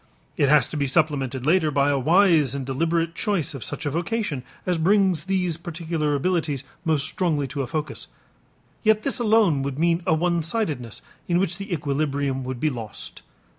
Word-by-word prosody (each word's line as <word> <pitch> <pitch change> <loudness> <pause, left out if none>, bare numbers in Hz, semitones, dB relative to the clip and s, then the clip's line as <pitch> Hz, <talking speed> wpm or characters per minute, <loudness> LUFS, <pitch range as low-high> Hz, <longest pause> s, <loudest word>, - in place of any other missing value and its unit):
It 140 - +2
has 150 -4 +5
to - - -7
be 140 -1 0
supplemented 135 -4 0
later 160 0 +3
by 140 -1 +2
a 140 - +1
wise 160 -2 +4
and 135 -2 -4
deliberate 165 +5 0
choice 190 -5 -1
of 135 - -6
such - - -5
a 145 - 0
vocation 170 - -2 0.2
as 180 -2 0
brings 185 -2 +3
these 180 -4 0
particular 165 -3 -2
abilities 155 -3 0 0.2
most 155 -4 +1
strongly 155 -3 -1
to 140 +1 -3
a 130 - -3
focus. 150 +3 -4 0.7
Yet 215 -1 +3
this 275 -1 0
alone 215 -10 +3
would 135 0 -3
mean 170 +2 +2
a 160 - +4
one 170 +1 +1
sidedness 155 - -3 0.2
in 175 - +2
which 180 0 0
the 200 +1 -7
equilibrium 140 -3 -1
would 130 -1 -4
be 155 +3 +1
lost. 115 -5 -7
155 Hz, 180 wpm, -24 LUFS, 140-175 Hz, 0.7 s, has